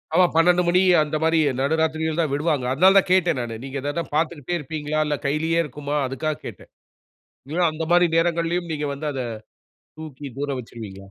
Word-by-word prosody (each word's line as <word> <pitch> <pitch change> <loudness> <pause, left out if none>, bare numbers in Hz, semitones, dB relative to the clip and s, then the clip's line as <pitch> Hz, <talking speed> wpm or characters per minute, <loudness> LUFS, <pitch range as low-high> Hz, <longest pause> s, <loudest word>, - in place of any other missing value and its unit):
ஆமா. 180 +1 +6
12 175 +2 +4
மணி 180 +1 +4 0.2
அந்த 150 0 -4
மாரி 160 0 +3 0.2
நடுராத்திரிகள் 160 +2 0
தான் 155 -4 -1
விடுவாங்க. 145 -3 0
அதனால 185 +8 +5
தான் 195 - +3
கேட்டேன் 180 -6 +3
நானு. 115 -1 -5
நீங்க 135 +1 -5
ஏதாது 145 +5 -2
பார்த்துட்டே 165 +1 -1
இருப்பீங்களா? 150 +1 -3
இல்ல 145 -1 -1
கையிலேயே 160 +4 +1
இருக்குமா? 145 0 -5
அதுக்கா 135 +4 -2
கேட்டேன். - - -10 0.8
இல்ல 165 +4 -1
அந்த 155 +1 -5
மாரி 175 0 +5
நேரங்கள்லேயும் 170 +1 0
நீங்க 150 -1 -2
வந்து 145 +2 -5
அத 135 - -3 0.8
தூக்கி 150 -3 -8
தூர 145 +1 -2
வச்சுருவீங்களா? 105 -5 -10
155 Hz, 170 wpm, -23 LUFS, 140-170 Hz, 0.8 s, ஆமா